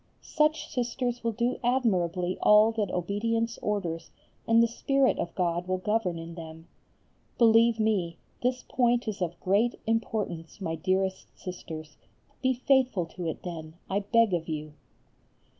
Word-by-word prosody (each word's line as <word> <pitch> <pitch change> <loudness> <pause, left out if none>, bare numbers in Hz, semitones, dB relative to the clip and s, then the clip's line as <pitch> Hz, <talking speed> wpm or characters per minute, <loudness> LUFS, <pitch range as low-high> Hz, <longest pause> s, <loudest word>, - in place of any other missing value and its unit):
Such 305 0 +1
sisters 245 0 -2
will 230 -1 0
do 240 +3 -1
admirably 185 -8 +1
all 210 +1 +6
that 215 -4 -1
obedience 225 +6 -1
orders 175 -6 -2 0.4
and 230 +1 +6
the - - +4
spirit 275 +3 +1
of 170 - -3
God 175 -1 0
will 185 0 0
govern 200 -2 0
in 165 0 -7
them. 160 -1 -10 0.7
Believe 230 0 +5
me, 195 -6 +1 0.2
this 250 +1 0
point 245 -1 +2
is 205 -3 -4
of 170 -1 -2
great 205 +6 +2
importance, 210 -7 -2
my 165 -5 -3
dearest 190 +3 -1
Sisters. 160 -4 -8 0.4
Be 260 0 +3
faithful 255 -6 +2
to 175 -2 -4
it, 160 - -4
then, 160 -3 -7 0.2
I 195 - +2
beg 225 0 +3
of 165 -2 -1
you. 155 -1 -4
205 Hz, 145 wpm, -28 LUFS, 175-235 Hz, 0.7 s, all